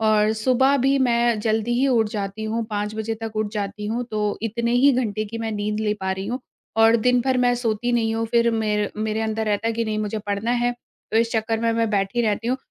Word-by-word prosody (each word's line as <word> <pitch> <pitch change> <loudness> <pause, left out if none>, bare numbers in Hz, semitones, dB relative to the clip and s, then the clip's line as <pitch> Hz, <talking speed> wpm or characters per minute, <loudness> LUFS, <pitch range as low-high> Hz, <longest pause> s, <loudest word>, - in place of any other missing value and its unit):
और 215 -1 +3
सुबह 255 +5 +3
भी 270 +1 +2
मैं 235 -2 +2
जल्दी 220 +2 0
ही 275 - +3
उठ 230 -4 +2
जाती 205 +1 -4
हूँ 225 +1 -1
5:00 210 0 -2
बजे 220 +1 -2
तक 220 -1 -5
उठ 215 -1 -1
जाती 210 0 -4
हूँ, 235 +3 -2
तो 210 -1 -1
इतने 235 +1 -1
ही 265 +3 +5
घंटे 215 -4 -1
की 230 +2 -7
मैं 225 -1 -3
नींद 210 +1 -2
ले 210 -1 0
पा 190 0 -1
रही 190 +1 -5
हूँ 245 +4 -3 0.4
और 225 +1 +6
दिन-भर 250 +2 +2
मैं 245 0 +3
सोती 240 0 -1
नहीं 225 -2 +1
हूँ 225 0 -1
फिर 235 -1 +3
मेर 210 -2 0
मेरे 215 0 -1
अंदर 220 0 -1
रहता 210 +2 0
कि 230 0 -1
नहीं, 215 -1 -2
मुझे 215 0 -2
पढ़ना 205 +2 -2
है 245 0 +1 0.4
तो - - +2
इस 230 0 +2
चक्कर 225 0 0
में 230 0 +1
मैं 230 0 +1
बैठी 200 +2 0
रहती 220 +1 0
हूँ 255 - +1
225 Hz, 235 wpm, -23 LUFS, 215-235 Hz, 0.4 s, और